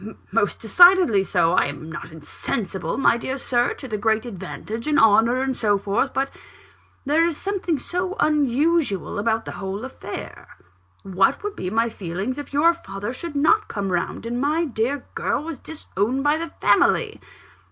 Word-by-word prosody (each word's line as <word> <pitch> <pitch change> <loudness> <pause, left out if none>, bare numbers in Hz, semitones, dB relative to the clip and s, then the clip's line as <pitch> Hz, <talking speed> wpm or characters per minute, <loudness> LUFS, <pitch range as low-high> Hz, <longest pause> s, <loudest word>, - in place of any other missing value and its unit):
most 205 0 0
decidedly 350 - +6
so! 175 -3 +2
I 185 - +3
am 145 +2 -6
not 160 - -7
insensible, 165 +3 -4
my 270 - +4
dear 260 +3 -4
Sir, 245 -2 0
to 265 - -9
the 215 -3 -3
great 220 +1 +1
advantage, 215 - -6
and 300 -1 +2
honour, 225 +4 +4
and 265 -1 -1
so 210 -4 +2
forth. 200 +7 -1
But 270 0 -1 0.7
there 305 +4 +3
is 335 -3 0
something 380 -5 -2
so 360 +7 -3
unusual 295 - +1
about 225 +1 0
the - - -5
whole 195 +4 -5
affair. 265 - -8 0.6
What 195 - +1
would 415 -1 -4
be 180 - -4
my 225 +3 +1
feelings, 200 +5 -4
if 290 - -8
your 305 +4 +4
father 205 -7 -6
should 320 +3 -7
not 425 +10 +3
come 200 -3 -3
round, 175 +5 -2
and 240 +2 -2
my 310 +4 +1
dear 255 +1 -2
girl - - -1
was 320 -4 -6
disowned 265 -4 -3
by 295 +2 +2
the 335 - -3
family? - - +2
240 Hz, 170 wpm, -23 LUFS, 200-300 Hz, 0.7 s, decidedly